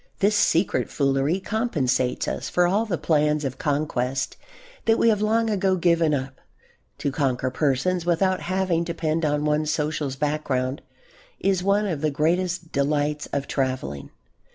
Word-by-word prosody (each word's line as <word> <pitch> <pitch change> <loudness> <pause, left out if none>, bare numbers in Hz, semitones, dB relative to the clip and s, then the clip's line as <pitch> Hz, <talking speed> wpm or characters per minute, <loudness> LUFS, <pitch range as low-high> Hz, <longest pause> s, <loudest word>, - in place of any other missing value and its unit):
This 205 +2 +2
secret 185 -2 +2
foolery 140 +5 +1
compensates 150 - 0
us - - -3
for 180 - +3
all 205 +6 +1
the 180 -5 -1
plans 150 -2 +1
of 130 -1 -4
conquest 140 -5 -1 0.5
that 225 0 +4
we 230 - +4
have 210 -2 +2
long 225 +2 +2
ago 195 -3 +1
given 170 -3 +2
up. 130 -2 -3 0.6
To 140 - -2
conquer 130 -3 0
persons 155 +6 0
without 180 +2 +1
having 185 -2 0
to 170 - -3
depend 160 0 -1
on 150 0 0
one's 150 0 +1
social 150 -1 -1
background 145 -2 -1 0.6
is 190 -2 +1
one 200 +3 +2
of 165 -8 -2
the 155 - +2
greatest 170 +3 0
delights 145 +1 0
of 140 -1 -2
travelling. 130 - -3
155 Hz, 155 wpm, -24 LUFS, 140-185 Hz, 0.6 s, that